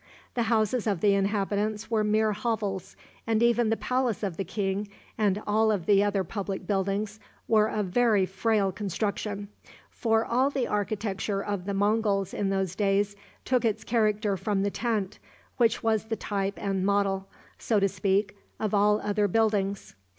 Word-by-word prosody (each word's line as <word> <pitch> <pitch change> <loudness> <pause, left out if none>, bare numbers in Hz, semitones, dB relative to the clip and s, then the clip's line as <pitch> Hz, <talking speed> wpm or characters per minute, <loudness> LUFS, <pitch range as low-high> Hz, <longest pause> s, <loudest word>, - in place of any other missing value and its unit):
The 235 -2 0
houses 225 +1 +1
of 200 -5 0
the 205 -1 +4
inhabitants 205 +2 -1
were 220 -2 +2
mere 215 +1 +2
hovels, 205 -4 -3 0.3
and 225 0 +2
even 235 -1 +3
the 225 - +1
palace 250 -4 -1
of 190 -5 -2
the 195 - -2
king, 195 +2 -2 0.3
and 210 -1 +1
all 215 0 +3
the 195 +3 +3
other 200 -2 +1
public 195 +1 -4
buildings, 200 +2 -1 0.3
were 215 -1 +4
of 210 -2 -1
very 215 -2 +3
frail 195 +1 +1
construction; 205 +1 -3 0.4
for 225 -1 +1
all 255 +3 +2
the 270 -3 -1
architecture 205 -1 -2
of 200 -3 -3
the 200 0 -2
Monguls 200 -1 +1
in 200 - -1
those 190 -2 -1
days 200 0 +1 0.3
took 255 -1 +2
its 220 -1 0
character 215 -3 +1
from 195 +1 -1
the 200 - 0
tent, 215 -4 -2 0.4
which 235 -2 +2
was 220 -1 +1
the 225 0 -2
type 200 -1 -2
and 195 -2 -1
model, 195 -1 +1 0.3
so 220 -3 +1
to 195 - +3
speak, 195 +2 0 0.2
of 215 -2 -2
all 210 +1 +4
other 205 0 +1
buildings. 200 -1 0
205 Hz, 165 wpm, -27 LUFS, 195-220 Hz, 0.4 s, the